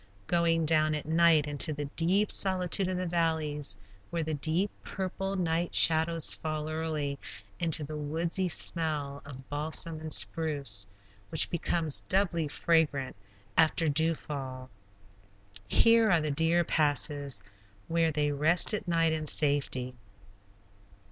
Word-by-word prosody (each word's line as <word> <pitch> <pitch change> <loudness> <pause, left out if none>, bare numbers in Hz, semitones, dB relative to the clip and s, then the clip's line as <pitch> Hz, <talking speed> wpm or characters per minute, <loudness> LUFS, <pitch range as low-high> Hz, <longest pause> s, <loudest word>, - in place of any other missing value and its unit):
Going 165 +2 +1
down 155 0 +2
at 150 - -6
night 160 -1 +3
into 145 +2 -1
the 145 0 -5
deep 180 +8 0
solitude 185 0 +2
of 185 -1 -3
the 185 - -3
valleys, 160 - -1 0.3
where 170 -1 -3
the 155 0 -4
deep, 160 +7 -1
purple 195 0 -5
night 170 -1 -2
shadows 160 0 +5
fall 155 -1 -5
early, 155 -3 -4 0.4
into 165 -2 0
the 155 +2 -7
woodsy 165 +5 -2
smell 150 -5 0
of 135 -2 -11
balsam 155 +2 -2
and 155 0 -8
spruce, 140 - +1 0.4
which - - 0
becomes 165 -3 0
doubly 175 -5 +1
fragrant 145 -4 0 0.4
after 165 +1 +2
dew 160 +3 +2
fall. 130 -4 -8 1.0
Here 230 - +4
are 170 - +3
the 155 -1 -3
deer 165 +4 +1
passes, 145 -3 -1 0.4
where 165 0 +1
they 150 -1 -1
rest 155 +8 +5
at 210 -2 -4
night 165 -2 +1
in 155 -1 -4
safety. 140 -4 +1
160 Hz, 130 wpm, -28 LUFS, 145-170 Hz, 1.0 s, shadows